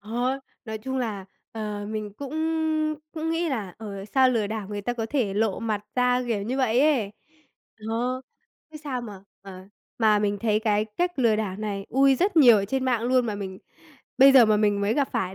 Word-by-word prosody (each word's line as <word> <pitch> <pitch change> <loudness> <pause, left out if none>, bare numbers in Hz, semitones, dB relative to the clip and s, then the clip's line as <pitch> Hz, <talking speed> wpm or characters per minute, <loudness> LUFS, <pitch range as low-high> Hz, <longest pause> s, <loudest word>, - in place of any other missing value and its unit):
Ờ. 245 +6 -2 0.3
Nói 220 -2 -5
chung 265 +4 -4
là, 210 -6 -3 0.3
ờ, 210 -2 -5
mình 215 -1 -5
cũng 280 +1 -7 0.8
cũng 320 0 -3
nghĩ 330 0 0
là, 210 -9 -4
ờ, 200 -3 -7
sao 260 +5 +3
lừa 225 -4 0
đảo 215 -2 -5
người 205 -1 -4
ta 245 - -2
có 230 -2 -3
thể 230 -9 0
lộ 215 -2 0
mặt 215 -2 -3
ra, 250 0 +2
kiểu 220 -4 -1
như 250 +6 -3
vậy 250 -1 +2
ấy. 270 -9 +2 0.8
Ờ. 245 +3 -1 0.5
Thế 305 - -10
sao 280 -4 -4
mà, 205 -4 -9 0.2
ờ, 185 -1 -11 0.3
mà 215 -2 +4
mình 205 -1 -1
thấy 215 -2 +1
cái 210 -1 +1
cách 350 +10 -3
lừa 230 -4 +3
đảo 205 -4 -3
này 205 -2 -4
ui 270 +2 +4
rất 365 +6 0
nhiều 245 -7 +8
ở 200 - 0
trên 260 +5 -2
mạng 245 -3 +1
luôn 250 0 +2
mà 215 - -2
mình 190 -2 -6 0.6
bây 270 0 +8
giờ 250 -4 +8
mà 215 - +3
mình 205 -1 +1
mới 205 +2 +1
gặp 280 -2 +1
phải 190 0 -2
220 Hz, 210 wpm, -25 LUFS, 205-255 Hz, 0.8 s, nhiều